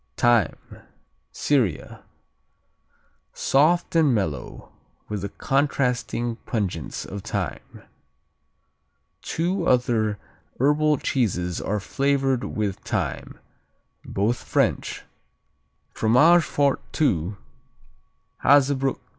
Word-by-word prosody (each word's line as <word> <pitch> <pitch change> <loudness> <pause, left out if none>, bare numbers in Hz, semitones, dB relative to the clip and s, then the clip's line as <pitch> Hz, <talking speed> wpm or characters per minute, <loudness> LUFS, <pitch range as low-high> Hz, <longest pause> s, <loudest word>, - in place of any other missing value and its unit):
Thyme 120 -9 +3 0.7
Syria 125 - -1 1.3
Soft 165 +6 +2
and 150 -6 +4
mellow, 80 - -4 0.4
with 105 -2 -4
the 100 - -4
contrasting 125 -3 -1
pungence 95 - -4
of 100 +1 -7
thyme. - - -5 1.4
Two 175 +2 -1
other 115 -4 +2 0.4
herbal 150 +2 +3
cheeses 90 -11 -1
are 105 +2 -1
flavored 135 +3 0
with 105 -3 -2
thyme - - -4 0.7
both 110 +5 -1
French: - - -1 0.9
Fromage 150 +11 +5
Fort 140 -1 +1 0.2
II, 95 - +1 1.1
Hazebrook 135 -1 +4
II. - - -36
125 Hz, 80 wpm, -24 LUFS, 105-140 Hz, 1.4 s, Fromage